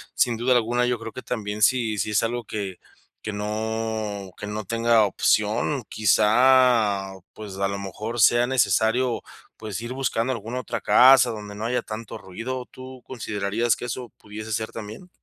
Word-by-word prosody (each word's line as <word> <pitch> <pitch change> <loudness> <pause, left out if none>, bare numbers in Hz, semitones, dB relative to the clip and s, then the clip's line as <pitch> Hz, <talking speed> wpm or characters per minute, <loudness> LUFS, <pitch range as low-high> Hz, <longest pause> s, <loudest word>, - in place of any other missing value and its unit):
sin 120 -2 +2
duda 125 +2 +2
alguna 120 +1 +2
yo 125 0 0
creo 115 0 -7
que 130 - -8
también 105 -3 -4
si 115 -1 +2
si - - -1
es 105 - +2
algo 120 +1 -2
que 100 -4 -5 0.4
que 105 - -5
no 110 -1 -3
que 105 - -7
no 105 +1 -4
tenga 115 +1 +3
opción, 105 +7 +1
quizá, 110 -1 +3 0.2
pues, 105 -3 -9
a 100 0 +1
lo 100 0 -3
mejor 105 +4 -5
sea 120 +3 +5
necesario, 115 +1 +2 0.4
pues, 110 -2 -5
ir 120 +1 -6
buscando 130 -2 -1
alguna 115 +2 -5
otra - - -4
casa 130 0 +6
donde 105 -2 -7
no 105 +2 -5
haya 125 +2 0
tanto 110 0 -7
ruido, 115 +6 -6
¿tú 130 0 -11
considerarías 110 -1 -1
que - - -7
eso 120 0 -5
pudiese 110 +1 -9
ser 110 +1 -2
también? 110 - -9
110 Hz, 170 wpm, -24 LUFS, 105-120 Hz, 0.4 s, casa